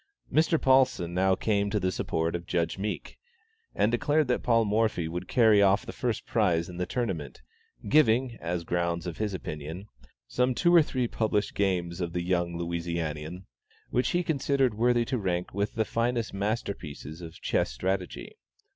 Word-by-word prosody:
Mr. 160 +1 +3
Paulsen 130 -10 +3
now 95 +1 +3
came 100 0 0
to 105 +1 0
the 95 -1 0
support 80 -1 -1
of 85 0 -5
Judge 85 +2 -1
Meek, 105 +2 -4 0.6
and 105 - +2
declared 145 +5 +2
that 125 - +1
Paul 115 -2 +3
Morphy 105 -5 +1
would 90 +2 -5
carry 110 -4 +5
off 100 +5 +3
the 115 - -7
first 120 -3 -2
prize 90 -7 +1
in 90 - -9
the 90 0 -2
tournament; 85 - -3 0.4
giving, 125 -2 +3
as 85 +1 -2
the - - -13
grounds 85 0 -1
of 85 -2 -5
his 105 -3 -1
opinion, 80 +1 -6 0.4
some 125 0 +1
two 175 +5 +3
or 170 - +8
three 130 -5 -1
published 110 -3 -1
games 90 -3 -1
of 85 -1 -3
the 90 0 -1
young 85 -1 0
Louisianian, 85 0 -4 0.5
which 125 - +1
he 175 +1 +1
considered 140 -5 +1
worthy 120 +2 +2
to 130 0 -1
rank 90 -3 -2
with 100 +5 -2
the 110 -1 +1
finest 115 +1 -1
master 100 +2 -1
pieces 75 0 -9
of 80 -1 -9
chess - - 0
strategy. 90 +8 -3
100 Hz, 175 wpm, -28 LUFS, 85-120 Hz, 0.6 s, or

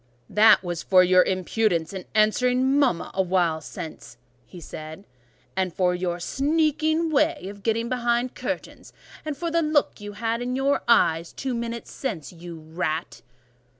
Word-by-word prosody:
"That 215 +1 +6
is 175 -2 -3
for 185 -1 +5
your 185 0 +5
impudence 185 -2 0
in 190 -2 -6
answering 250 +5 +3
mama 250 -12 +1
awhile 180 -4 +1
since," 150 -6 -9 0.4
said 155 -1 -8
he, 195 - -19 0.5
"and 185 -1 0
for 180 +1 +1
your 180 -1 -2
sneaking 315 - +1
way 305 - +1
of 200 0 -11
getting 230 +2 0
behind 240 0 0
curtains, 285 +3 -6 0.3
and 305 -2 -4
for 335 +3 -3
the 335 +1 +2
look 305 -7 +1
you 205 0 -7
had 230 +2 -2
in 250 +1 -2
your 275 +2 +1
eyes 170 -8 +3
two 265 -1 -3
minutes 235 0 -5
since, 180 - -5
you 170 -1 -9
rat!" 160 -4 -4
215 Hz, 150 wpm, -24 LUFS, 175-260 Hz, 0.5 s, That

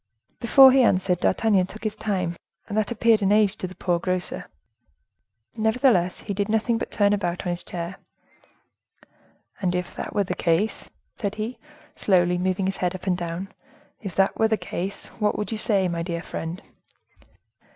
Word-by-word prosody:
Before 265 +3 +8
he 265 0 +5
answered, 185 -6 +2
D'Artagnan 195 -2 +2
took 215 +3 -11
his 215 -1 -2
time, 185 -6 -2 0.3
and 205 - -5
that 215 -1 +1
appeared 230 -1 +3
an 195 0 +2
age 210 -1 +4
to 185 - -4
the 185 - -11
poor 175 -2 0
grocer. 185 +1 -3 1.1
Nevertheless 220 -5 +2
he 205 - -4
did 200 +1 -2
nothing 225 +1 +1
but - - -4
turn 205 -1 +2
about 180 -3 -2
on 175 - 0
his 175 - -2
chair. 170 +1 -6 1.6
"And 180 -2 0
if 180 0 -3
that - - -6
were 205 - +3
the 185 - -3
case," 175 +6 0 0.2
said 205 -1 -3
he, 220 +4 -4 0.4
slowly, 180 -2 +2
moving 185 +1 0
his 195 +1 -2
head 180 0 -1
up 185 - -9
and 185 -2 +2
down, 175 +2 -5 0.5
"if 195 -6 -6
that 195 0 +2
were 225 - +5
the 220 0 +1
case, 190 0 -4 0.2
what 210 - +2
would 210 - -3
you 220 - -2
say, 195 -4 +2
my 170 -1 -2
dear 170 0 -3
friend?" 165 +3 -6
195 Hz, 180 wpm, -24 LUFS, 180-215 Hz, 1.6 s, Before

